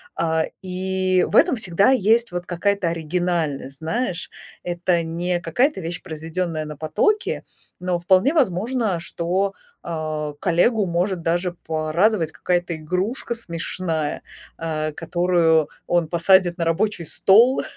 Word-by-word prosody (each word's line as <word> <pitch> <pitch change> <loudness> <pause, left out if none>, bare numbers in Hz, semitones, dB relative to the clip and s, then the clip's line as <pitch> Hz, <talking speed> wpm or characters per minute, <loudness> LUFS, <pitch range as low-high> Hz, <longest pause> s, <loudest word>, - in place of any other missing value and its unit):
А, 160 -1 +1 0.2
и 185 0 0
в - - -3
этом 335 -2 +5
всегда 195 -1 +2
есть 230 -2 +3
вот 175 0 -4
какая-то 185 +1 0
оригинальность, 165 -4 -2
знаешь. 180 +2 -2 0.3
Это 175 0 0
не 175 +2 -2
какая-то 220 - +1
вещь, 165 0 -5
произведённая 160 -1 -4
на 150 -1 -8
потоке. 410 - 0 0.4
Но 180 -1 -1
вполне 185 - +3
возможно, 225 - +1
что, 180 +4 -1 0.3
а, 155 -2 -3
коллегу 195 +5 +2
может 175 +1 -1
даже 175 +2 0
порадовать 160 +3 +1
какая-то 175 0 -1
игрушка 185 - -2
смешная, 165 -5 -3 0.4
э, 155 -1 -2
которую 165 -1 +2 0.2
он 175 -2 +2
посадит 175 +1 +4
на 170 - -1
рабочий 175 +2 0
стол, 225 - +4
175 Hz, 120 wpm, -22 LUFS, 165-190 Hz, 0.4 s, этом